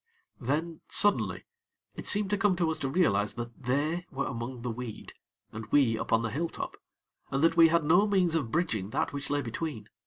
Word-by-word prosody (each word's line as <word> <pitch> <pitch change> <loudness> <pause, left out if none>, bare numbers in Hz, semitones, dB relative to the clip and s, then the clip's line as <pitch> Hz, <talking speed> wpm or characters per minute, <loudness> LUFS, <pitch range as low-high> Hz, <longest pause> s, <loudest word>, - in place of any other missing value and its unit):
Then, 155 +6 -2
suddenly, 205 -1 +3 0.5
it - - -6
seemed 205 -1 +3
to 205 - +2
come 200 -2 +3
to 170 -2 +1
us 160 - -3
to 135 - -2
realize 105 - +1
that 120 +2 -8
they 155 +7 0
were 140 -2 -3
among 120 0 -5
the 125 - -2
weed, 115 -1 -7 0.4
and 110 0 -7
we 135 -6 +4
upon 115 +1 0
the 115 - -2
hilltop, 165 +7 -3 0.5
and 135 +2 -1
that 165 0 +4
we 165 -1 +8
had 165 0 +2
no 175 +7 +4
means 185 -5 +2
of 155 -8 0
bridging 110 - -1
that 110 - -1
which 140 0 -5
lay 145 0 0
between. 115 -2 -5
145 Hz, 195 wpm, -29 LUFS, 120-170 Hz, 0.5 s, we